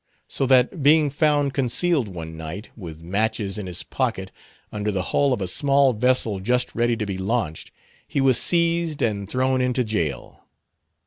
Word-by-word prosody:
So 135 - -1
that 130 +5 +3
being 150 +1 +4
found 145 -1 +1
concealed 140 +1 +1
one 80 -4 -8
night, 80 +7 -8
with 80 -7 -9
matches 105 +2 -1
in 100 - -6
his 90 -1 -3
pocket, 110 -8 -3 0.4
under 105 0 -3
the 95 -3 -1
hull 140 -1 +3
of 120 -5 -1
a 95 - -2
small 140 +5 +3
vessel 115 -3 +1
just 125 +5 0
ready 120 0 +1
to 110 - -2
be 95 -2 -4
launched, 95 -6 -2 0.4
he - - -2
was 135 -2 +4
seized 170 -2 +1
and 100 -3 -2
thrown 130 +1 +1
into 125 0 +1
jail. 85 - -4
120 Hz, 170 wpm, -23 LUFS, 95-135 Hz, 0.4 s, being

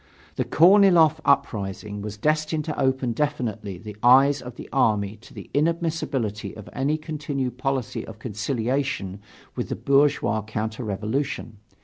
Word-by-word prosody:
The - - -1
Korniloff 175 -3 +6
uprising 105 -6 0
was 105 0 -6
destined 155 +4 0
to 155 - -4
open 130 -2 +1
definitely 115 -8 -2
the 105 +2 -9
eyes 135 +3 +6
of 125 -1 -9
the - - -9
army 105 -6 +2
to 115 - -17
the - - -10
inadmissibility 150 -10 -1
of 110 - -10
any 140 +3 0
continued 140 -5 -4
policy 135 -3 -2
of 110 - -9
conciliation 115 -2 -2 0.4
with - - -3
the - - -2
bourgeois 140 -6 +2
counter 110 +2 -4
revolution. 110 +3 -3
130 Hz, 135 wpm, -24 LUFS, 110-145 Hz, 0.4 s, Korniloff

